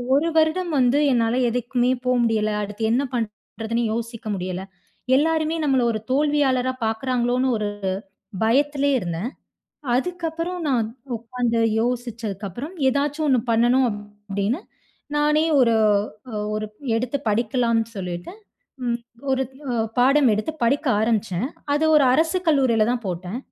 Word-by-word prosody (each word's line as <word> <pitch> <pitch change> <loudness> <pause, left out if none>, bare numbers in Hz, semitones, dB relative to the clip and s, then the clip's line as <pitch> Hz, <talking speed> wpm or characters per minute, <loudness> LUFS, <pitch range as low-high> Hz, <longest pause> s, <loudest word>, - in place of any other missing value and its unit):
ஒரு 305 +4 +2
வருடம் 325 +3 +2
வந்து 255 +3 +3
என்னால 230 -1 +2 0.2
எதுக்குமே 245 +1 0
போ 250 - +2
முடியல. 215 -2 +1
அடுத்து 205 +2 -6
என்ன 255 +4 +2
பண்றதுன்னு 225 +1 -3
யோசிக்க 230 -1 -5
முடியல. 185 0 -4 0.6
எல்லாருமே 320 +1 +1
நம்மள 265 -3 +3
ஒரு 215 - -3
தோல்வியாளரா 270 -3 +2
பாக்குறாங்களோன்னு 245 +2 0
ஒரு 210 -1 -2 0.7
பயத்லயே 280 +4 +2
இருந்தேன். 175 +4 -3 0.7
அதுக்கப்புறம் 345 +3 -2
நான் 235 -5 +1 0.4
உக்காந்து 235 -1 -1 0.2
யோசிச்சதுக்கப்புறம் 235 - -4 0.2
"ஏதாச்சும் 290 +3 0
1 260 -3 +4
பண்ணணும்" 240 +3 +4
அப்டின்னு, 205 - -4 0.6
நானே 300 +1 +3 0.2
ஒரு 230 -2 +4 0.6
அ - - -8 0.2
ஒரு 215 0 -2 0.3
எடுத்து 250 +4 -1
படிக்கலான்னு 230 +1 +1
சொல்லிட்டு, 180 - -5 0.5
ம் 235 -1 0 0.3
ஒரு 265 0 +2 0.3
அ - - -1 0.2
பாடம் 265 +2 +5
எடுத்து 215 +9 -1
படிக்க 275 +5 +1
ஆரம்பிச்சேன். 220 -2 0 0.3
அது 300 +2 +2
ஒரு 295 - +6
அரசு 320 +6 +2
கல்லூரில 260 -8 +3
தான் 245 -1 -2
போட்டேன். 180 +4 -4
245 Hz, 120 wpm, -23 LUFS, 220-280 Hz, 0.7 s, ஒரு